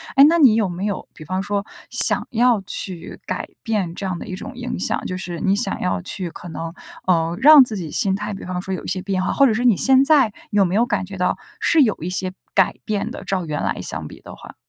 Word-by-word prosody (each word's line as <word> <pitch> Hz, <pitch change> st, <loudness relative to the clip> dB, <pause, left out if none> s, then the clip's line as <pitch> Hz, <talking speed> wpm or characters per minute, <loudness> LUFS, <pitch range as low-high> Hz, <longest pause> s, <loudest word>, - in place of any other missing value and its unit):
诶， 275 Hz, -, +7 dB
那 335 Hz, +2 st, +3 dB
你 265 Hz, -8 st, +6 dB
有 220 Hz, -3 st, +1 dB
没 175 Hz, +3 st, -5 dB
有， 205 Hz, -2 st, -4 dB
比 155 Hz, -, -12 dB
方 185 Hz, +4 st, -3 dB
说， 200 Hz, 0 st, -3 dB, 0.2 s
想 -, -, +6 dB
要 240 Hz, -2 st, +2 dB
去 180 Hz, -2 st, -4 dB
改 -, -, -4 dB, 0.2 s
变 205 Hz, -7 st, -2 dB
这 195 Hz, -, -5 dB
样 185 Hz, -2 st, -3 dB
的 -, -, -9 dB
一 185 Hz, -, -5 dB
种 195 Hz, -, -8 dB
影 245 Hz, -1 st, -5 dB
响？ -, -, 0 dB
就 185 Hz, -, -4 dB
是 175 Hz, -3 st, -5 dB
你 195 Hz, 0 st, +1 dB
想 205 Hz, -2 st, +1 dB
要 180 Hz, -, -1 dB
去， 180 Hz, 0 st, -4 dB
可 170 Hz, +1 st, -11 dB
能， 165 Hz, +1 st, -6 dB, 0.4 s
呃， 165 Hz, -2 st, +1 dB
让 300 Hz, -1 st, +9 dB
自 230 Hz, -4 st, -3 dB
己 170 Hz, -4 st, -6 dB
心 190 Hz, -1 st, +1 dB
态 210 Hz, +1 st, -5 dB
比 195 Hz, -, -8 dB
方 180 Hz, 0 st, -4 dB
说 190 Hz, -, -5 dB
有 185 Hz, -, -5 dB
一 -, -, -8 dB
些 185 Hz, 0 st, -1 dB
变 190 Hz, -1 st, -2 dB
化。 -, -, -1 dB
或 275 Hz, -, +4 dB
者 230 Hz, -, +1 dB
是 240 Hz, +3 st, -2 dB
你 235 Hz, -5 st, +5 dB
现 265 Hz, 0 st, +5 dB
在， 275 Hz, -8 st, +5 dB, 0.2 s
有 205 Hz, -1 st, +3 dB
没 180 Hz, +1 st, -2 dB
有 230 Hz, +3 st, +3 dB
感 210 Hz, -5 st, -2 dB
觉 195 Hz, 0 st, -9 dB
到 180 Hz, -, 0 dB, 0.2 s
是 320 Hz, -, +3 dB
有 220 Hz, -6 st, +2 dB
一 170 Hz, -, -4 dB
些 185 Hz, 0 st, -1 dB, 0.2 s
改 190 Hz, -2 st, +2 dB
变 210 Hz, -2 st, -2 dB
的， -, -, -8 dB
照 185 Hz, -3 st, -2 dB
原 150 Hz, -2 st, -4 dB
来 -, -, -2 dB
相 -, -, -3 dB
比 -, -, -13 dB
的 -, -, -11 dB
话？ -, -, -13 dB
195 Hz, 280 characters per minute, -20 LUFS, 180-225 Hz, 0.4 s, 让